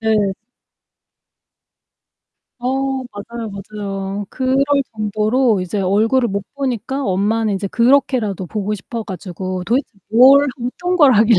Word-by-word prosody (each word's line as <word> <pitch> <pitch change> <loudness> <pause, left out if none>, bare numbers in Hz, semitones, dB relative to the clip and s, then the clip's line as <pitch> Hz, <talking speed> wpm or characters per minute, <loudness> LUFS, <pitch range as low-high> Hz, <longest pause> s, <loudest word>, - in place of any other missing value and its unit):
네. 215 -3 +2 2.3
어, 265 +1 -1
맞아요, 220 +2 -7
맞아요. 200 0 -5
그럴 260 0 0 0.4
정도로 215 +2 +1
이제 185 +3 -2
얼굴을 220 +6 +2
못 200 0 -2
보니까 265 0 -2
엄마는 210 +2 +1
이제 195 +1 -3
그렇게라도 235 -5 +2
보고 210 +2 -2
싶어 225 +3 -6
가지고 185 -1 -5
도대체 245 +8 +1 0.2
뭘 265 +5 +7 0.2
어떤 355 +8 -2
걸 290 -6 +6
하길래 220 0 +5
220 Hz, 260 characters per minute, -18 LUFS, 200-255 Hz, 2.3 s, 뭘